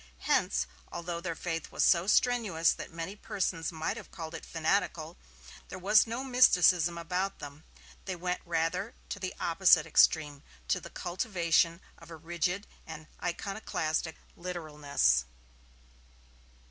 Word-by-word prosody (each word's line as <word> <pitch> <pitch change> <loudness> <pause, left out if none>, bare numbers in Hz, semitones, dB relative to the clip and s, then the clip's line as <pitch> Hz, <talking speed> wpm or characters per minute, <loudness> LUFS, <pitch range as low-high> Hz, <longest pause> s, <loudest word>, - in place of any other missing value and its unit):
Hence, 60 +1 +1 0.3
although 170 0 -4
their 170 -2 -3
faith 165 -1 -4
was - - 0
so 170 +1 +4
strenuous 215 -8 +3
that - - -8
many 165 +4 -6
persons 180 -5 -2
might 160 -1 -3
have - - -10
called 160 -3 -8
it - - -8
fanatical, 165 0 -1 0.5
there - - -7
was 210 +5 +4
no 235 +3 -3
mysticism 180 - +4
about 180 +3 -2
them. 145 +1 -10 0.4
They 190 - -3
went 180 +1 -3
rather 170 +5 -1
to 200 - -4
the 185 -1 -4
opposite 170 -2 +4
extreme, 150 -3 +3 0.3
to - - +2
the - - -10
cultivation 175 -3 0 0.2
of 165 - -15
a 165 - -8
rigid 175 +4 -2 0.2
and 160 -1 -8 0.2
iconoclastic 170 -3 -2 0.2
literalness. 150 - 0
170 Hz, 135 wpm, -30 LUFS, 160-185 Hz, 0.5 s, so